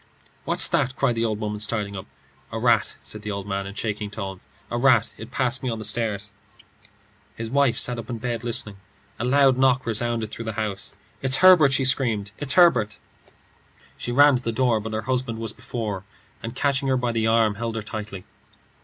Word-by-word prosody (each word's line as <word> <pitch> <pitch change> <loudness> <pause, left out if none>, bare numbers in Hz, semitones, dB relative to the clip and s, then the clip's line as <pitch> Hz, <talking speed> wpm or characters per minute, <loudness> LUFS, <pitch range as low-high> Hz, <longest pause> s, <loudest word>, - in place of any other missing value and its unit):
"What's - - +2
that?" 130 +1 0
cried 135 -3 +1
the 115 0 -1
old 110 -2 -2
woman, 105 -1 -3
starting 105 -1 -2
up. 95 - -7 0.4
"A - - -4
rat," - - +2
said 85 +10 -5
the 105 - -6
old 100 -1 -4
man 100 -1 -3
in 100 - -9
shaking 105 -1 -3
tones 95 -3 -7 0.2
"a 120 - -1
rat. 120 -4 +3
It 110 +2 -10
passed 130 0 0
me 130 - -2
on 115 - -3
the 110 - -5
stairs." 105 -2 -1 1.0
His 115 0 -6
wife 140 -4 +2
sat 120 -1 +1
up 115 - -8
in 120 - -3
bed 120 0 -3
listening. 110 -4 -2 0.4
A - - -2
loud 135 0 +4
knock 130 -1 +3
resounded 115 -1 -1
through 115 - -6
the 110 - -3
house. 100 -2 -4 0.3
"It's 130 0 +3
Herbert!" 160 -7 +7
she 135 - +2
screamed. 115 -6 +2
"It's 140 -3 +2
Herbert!" 165 - +4 1.0
She 120 - -4
ran 145 +1 +6
to - - -5
the 115 - -1
door, 115 -1 +2
but 110 +1 -6
her 110 - -1
husband 125 -2 -1
was 110 -1 -4
before 115 -5 -4
her, 95 - -22 0.4
and 115 +2 -6
catching 135 0 +1
her 130 -1 +2
by 125 -1 -1
the 115 -1 0
arm, 110 -2 +3
held 115 +2 -4
her 110 - -3
tightly. 105 -3 -7
115 Hz, 205 wpm, -24 LUFS, 105-125 Hz, 1.0 s, Herbert